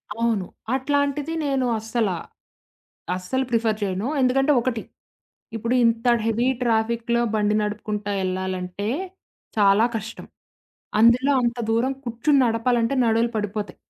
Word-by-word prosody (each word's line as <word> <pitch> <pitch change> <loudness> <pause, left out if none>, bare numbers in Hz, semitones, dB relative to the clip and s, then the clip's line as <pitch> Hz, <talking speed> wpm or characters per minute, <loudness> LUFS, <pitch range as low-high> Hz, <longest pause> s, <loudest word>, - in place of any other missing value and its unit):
అవును. 225 -4 0 0.3
అట్లాంటిది 285 +3 0
నేను 270 -2 0
అస్సలా 220 -4 -1 1.0
అస్సలు 260 +9 -2
ప్రిఫర్ 225 -2 +1
చేయను. 195 +2 -2
ఎందుకంటే 270 +3 +3
ఒకటి. 235 -2 -2 0.8
ఇప్పుడింత 230 0 +1 0.2
హెవీ 230 +3 +1
ట్రాఫిక్‌లో 235 +1 +1
బండి 210 0 +1
నడుపుకుంటా 210 0 -3
ఎళ్ళాలంటే 185 +1 -3 0.7
చాలా 205 +2 +5
కష్టం. 220 +2 -8 0.8
అందులో 245 +5 +5
అంత 240 0 0
దూరం 245 +4 +1
కూర్చొని 240 +5 +2
నడపాలంటే 230 +1 +1
నడుములు 230 +1 +2
పడిపోతాయి. 210 0 -3
230 Hz, 105 wpm, -23 LUFS, 210-250 Hz, 1.0 s, చాలా